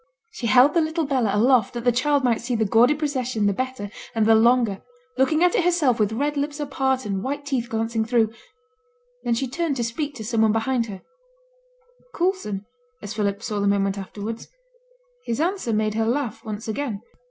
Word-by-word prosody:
She 245 Hz, -, -4 dB
held 255 Hz, +5 st, +6 dB
the 335 Hz, -, +3 dB
little 320 Hz, +1 st, -1 dB
Bella 260 Hz, -6 st, +1 dB
aloft 240 Hz, -1 st, +3 dB
that 235 Hz, -, -4 dB
the 245 Hz, -, +4 dB
child 280 Hz, +4 st, +1 dB
might 235 Hz, -3 st, +2 dB
see 240 Hz, +1 st, -2 dB
the 220 Hz, -1 st, +1 dB
gaudy 235 Hz, +8 st, +4 dB
procession 255 Hz, -7 st, -1 dB
the 200 Hz, -, +3 dB
better 255 Hz, -3 st, -4 dB, 0.2 s
and 220 Hz, -1 st, +2 dB
the 225 Hz, -, +6 dB
longer, 230 Hz, -2 st, +3 dB, 0.3 s
looking 310 Hz, +5 st, +2 dB
at 360 Hz, -, +4 dB
it -, -, +2 dB
herself 325 Hz, -9 st, +2 dB
with 210 Hz, -1 st, +2 dB
red 290 Hz, +6 st, -1 dB
lips 290 Hz, +1 st, -2 dB
apart 265 Hz, -2 st, -1 dB
and 195 Hz, -2 st, -2 dB
white 285 Hz, +5 st, -4 dB
teeth 255 Hz, -4 st, -2 dB
glancing 225 Hz, 0 st, -1 dB
through; 225 Hz, -1 st, +1 dB, 0.9 s
then 235 Hz, -, +1 dB
she 265 Hz, +3 st, -1 dB
turned 315 Hz, +3 st, -2 dB
to 240 Hz, -, -1 dB
speak 285 Hz, +5 st, -3 dB
to 225 Hz, -, -7 dB
some 225 Hz, 0 st, 0 dB
one 220 Hz, -1 st, +4 dB
behind 230 Hz, +1 st, 0 dB
her 195 Hz, -3 st, -9 dB, 1.1 s
Coulson, 340 Hz, -, -1 dB, 0.4 s
as 205 Hz, +1 st, -5 dB
Philip 205 Hz, 0 st, -2 dB
saw 210 Hz, -3 st, -2 dB
the 200 Hz, -, +1 dB
moment 195 Hz, -1 st, +1 dB
afterwards; 205 Hz, +3 st, -6 dB, 0.8 s
his 235 Hz, -, -2 dB
answer 350 Hz, -6 st, -1 dB
made 215 Hz, 0 st, +1 dB
her 225 Hz, 0 st, 0 dB
laugh 245 Hz, -2 st, -2 dB
once 215 Hz, 0 st, -6 dB
again. 220 Hz, -2 st, -3 dB
240 Hz, 195 wpm, -23 LUFS, 220-280 Hz, 1.1 s, held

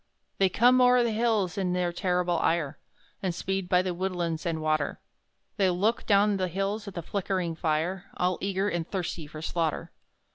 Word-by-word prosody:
They 195 Hz, -1 st, +4 dB
come 250 Hz, +6 st, +5 dB
o'er 250 Hz, 0 st, +6 dB
the 235 Hz, -, +1 dB
hills 215 Hz, -4 st, +1 dB
in 180 Hz, -2 st, 0 dB
their 180 Hz, -1 st, 0 dB
terrible 180 Hz, -1 st, 0 dB
ire, 165 Hz, -4 st, 0 dB, 0.4 s
And 185 Hz, -4 st, -1 dB
speed 190 Hz, 0 st, -2 dB
by 180 Hz, 0 st, +4 dB
the 185 Hz, -1 st, -2 dB
woodlands 175 Hz, -2 st, -2 dB
and 165 Hz, -1 st, -1 dB
water; 155 Hz, -2 st, 0 dB, 0.6 s
They 195 Hz, -3 st, +3 dB
look 200 Hz, +6 st, 0 dB
down 205 Hz, 0 st, +4 dB
the 185 Hz, -1 st, 0 dB
hills 195 Hz, +4 st, -2 dB
at 200 Hz, -, -7 dB
the 170 Hz, -, -4 dB
flickering 185 Hz, -2 st, -2 dB
fire, 165 Hz, +3 st, -1 dB
All 180 Hz, 0 st, 0 dB
eager 195 Hz, 0 st, 0 dB
and 175 Hz, -4 st, -2 dB
thirsty 175 Hz, -5 st, -3 dB
for 155 Hz, +1 st, -9 dB
slaughter. 165 Hz, -2 st, -2 dB
180 Hz, 180 wpm, -28 LUFS, 170-200 Hz, 0.6 s, o'er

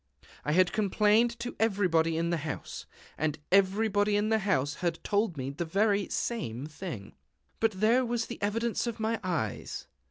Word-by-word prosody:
I 150 Hz, -, 0 dB
had 185 Hz, +1 st, +4 dB
complained 215 Hz, +3 st, +3 dB
to 245 Hz, +1 st, -4 dB
everybody 180 Hz, -7 st, +2 dB
in 170 Hz, +1 st, 0 dB
the 170 Hz, -, +1 dB
house; 150 Hz, -2 st, -6 dB, 0.3 s
and 155 Hz, 0 st, 0 dB
everybody 205 Hz, +2 st, +3 dB
in 210 Hz, +1 st, +1 dB
the 220 Hz, 0 st, +3 dB
house 145 Hz, -9 st, +1 dB
had 175 Hz, -2 st, 0 dB
told 205 Hz, -5 st, 0 dB
me 135 Hz, 0 st, -3 dB
the 145 Hz, +5 st, -3 dB
very 200 Hz, +3 st, +1 dB
same 140 Hz, -, -2 dB
thing. 150 Hz, -, -7 dB, 0.5 s
But 225 Hz, -1 st, +2 dB
there 220 Hz, +6 st, +3 dB
was 240 Hz, -1 st, -1 dB
the -, -, -8 dB
evidence 230 Hz, +4 st, 0 dB
of 235 Hz, -1 st, -4 dB
my 220 Hz, 0 st, 0 dB
eyes! 165 Hz, -, -3 dB
200 Hz, 165 wpm, -29 LUFS, 165-220 Hz, 0.5 s, had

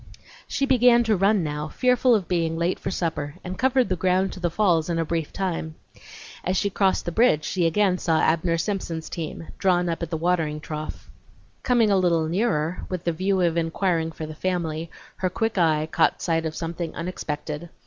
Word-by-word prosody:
She 275 Hz, -, 0 dB
began 245 Hz, -2 st, +5 dB
to 220 Hz, -2 st, +2 dB
run 195 Hz, 0 st, +3 dB
now, 150 Hz, 0 st, -3 dB
fearful 250 Hz, +5 st, +3 dB
of 195 Hz, -5 st, -1 dB
being 165 Hz, -2 st, 0 dB
late 170 Hz, +2 st, 0 dB
for -, -, -4 dB
supper, 160 Hz, -5 st, -3 dB
and 185 Hz, 0 st, -6 dB
covered 260 Hz, 0 st, +3 dB
the 185 Hz, -, 0 dB
ground 185 Hz, +2 st, +1 dB
to -, -, -9 dB
the 175 Hz, -1 st, 0 dB
falls 170 Hz, -3 st, +2 dB
in 170 Hz, -, 0 dB
a 165 Hz, -, 0 dB
brief 165 Hz, -2 st, -2 dB
time. 165 Hz, -4 st, -3 dB, 0.7 s
As 185 Hz, +1 st, 0 dB
she 200 Hz, -, 0 dB
crossed 195 Hz, -1 st, +1 dB
the 175 Hz, -, -2 dB
bridge 165 Hz, -7 st, +3 dB
she 175 Hz, -3 st, +1 dB
again 185 Hz, +1 st, +2 dB
saw 160 Hz, -2 st, +1 dB
Abner 165 Hz, +1 st, +2 dB
Simpson's 165 Hz, -3 st, -3 dB
team, 165 Hz, -1 st, -6 dB
drawn 180 Hz, -2 st, +2 dB
up 165 Hz, -, -3 dB
at 170 Hz, -, -3 dB
the 160 Hz, -, -2 dB
watering 160 Hz, -3 st, 0 dB
trough. 155 Hz, 0 st, -6 dB, 0.5 s
Coming 235 Hz, -4 st, +3 dB
a 195 Hz, -, +4 dB
little 170 Hz, -3 st, +2 dB
nearer, 175 Hz, -3 st, 0 dB
with 185 Hz, -2 st, -4 dB
the 170 Hz, -, +1 dB
view 190 Hz, +3 st, 0 dB
of 170 Hz, -1 st, +1 dB
inquiring 165 Hz, 0 st, 0 dB
for 160 Hz, -, -6 dB
the 155 Hz, -, -7 dB
family, 165 Hz, -1 st, -2 dB, 0.3 s
her 185 Hz, -, 0 dB
quick 225 Hz, +2 st, -1 dB
eye 155 Hz, -2 st, +2 dB
caught -, -, +2 dB
sight 165 Hz, -1 st, 0 dB
of 155 Hz, -, -6 dB
something 165 Hz, 0 st, -4 dB
unexpected. 160 Hz, -2 st, -5 dB
175 Hz, 200 wpm, -24 LUFS, 160-190 Hz, 0.7 s, began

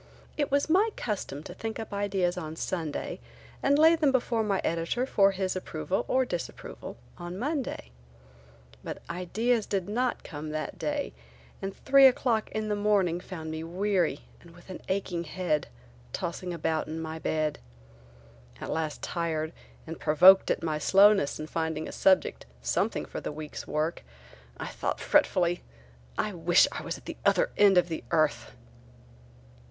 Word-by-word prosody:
It 290 Hz, -2 st, 0 dB
was 280 Hz, +1 st, +2 dB
my 385 Hz, +7 st, +4 dB
custom 190 Hz, -, -4 dB
to -, -, -8 dB
think 225 Hz, 0 st, -5 dB
up 220 Hz, -2 st, -6 dB
ideas 195 Hz, -3 st, 0 dB
on 160 Hz, -3 st, -5 dB
Sunday 160 Hz, -3 st, -3 dB, 0.4 s
and 280 Hz, +1 st, +3 dB
lay 320 Hz, +2 st, +7 dB
them 305 Hz, -4 st, +3 dB
before 240 Hz, -3 st, +1 dB
my 205 Hz, -3 st, 0 dB
editor 170 Hz, +10 st, 0 dB
for 200 Hz, -6 st, +4 dB
his 190 Hz, -1 st, -2 dB
approval 185 Hz, 0 st, -2 dB
or 260 Hz, 0 st, +2 dB
disapproval 175 Hz, -, -6 dB, 0.2 s
on 175 Hz, +1 st, -6 dB
Monday. 265 Hz, -, -3 dB, 0.9 s
But -, -, -6 dB
ideas 215 Hz, +6 st, 0 dB
did 195 Hz, -2 st, -1 dB
not 245 Hz, +4 st, -1 dB
come 155 Hz, -1 st, -7 dB
that 155 Hz, 0 st, -4 dB
day 295 Hz, -1 st, -2 dB, 0.5 s
and 195 Hz, 0 st, -5 dB
three 275 Hz, 0 st, +8 dB
o'clock 245 Hz, -4 st, +1 dB
in 215 Hz, 0 st, -2 dB
the 210 Hz, -, 0 dB
morning 200 Hz, -5 st, +2 dB
found 160 Hz, -4 st, -7 dB
me 160 Hz, 0 st, -4 dB
weary 180 Hz, -3 st, 0 dB, 0.2 s
and 170 Hz, 0 st, -16 dB
with 175 Hz, +2 st, -13 dB
an -, -, -8 dB
aching 185 Hz, -3 st, -1 dB
head 155 Hz, -3 st, -1 dB, 0.5 s
tossing 175 Hz, +1 st, -3 dB
about 160 Hz, -1 st, -1 dB
in 160 Hz, +1 st, -5 dB
my 160 Hz, 0 st, -5 dB
bed. 155 Hz, -1 st, -1 dB, 1.0 s
At -, -, -5 dB
last 160 Hz, -2 st, -3 dB
tired 160 Hz, -2 st, -2 dB, 0.3 s
and 165 Hz, 0 st, -7 dB
provoked 180 Hz, +5 st, +7 dB
at -, -, 0 dB
my 155 Hz, -2 st, -1 dB
slowness 195 Hz, -2 st, +5 dB
in 155 Hz, -, -4 dB
finding 160 Hz, 0 st, -2 dB
a -, -, -6 dB
subject, 190 Hz, -1 st, +2 dB
something 60 Hz, -, 0 dB
for -, -, -6 dB
the -, -, -4 dB
week's 150 Hz, 0 st, -7 dB
work, 155 Hz, +2 st, -1 dB, 0.5 s
I -, -, -5 dB
thought -, -, -3 dB
fretfully: 175 Hz, -1 st, +2 dB, 0.6 s
"I 210 Hz, -, -1 dB
wish 170 Hz, 0 st, +4 dB
I -, -, -5 dB
was -, -, -4 dB
at -, -, -17 dB
the -, -, -6 dB
other -, -, +3 dB
end 200 Hz, -2 st, +6 dB
of 180 Hz, -, +4 dB
the 165 Hz, -2 st, -5 dB
earth!" 150 Hz, -8 st, +1 dB
180 Hz, 160 wpm, -28 LUFS, 160-210 Hz, 1.0 s, three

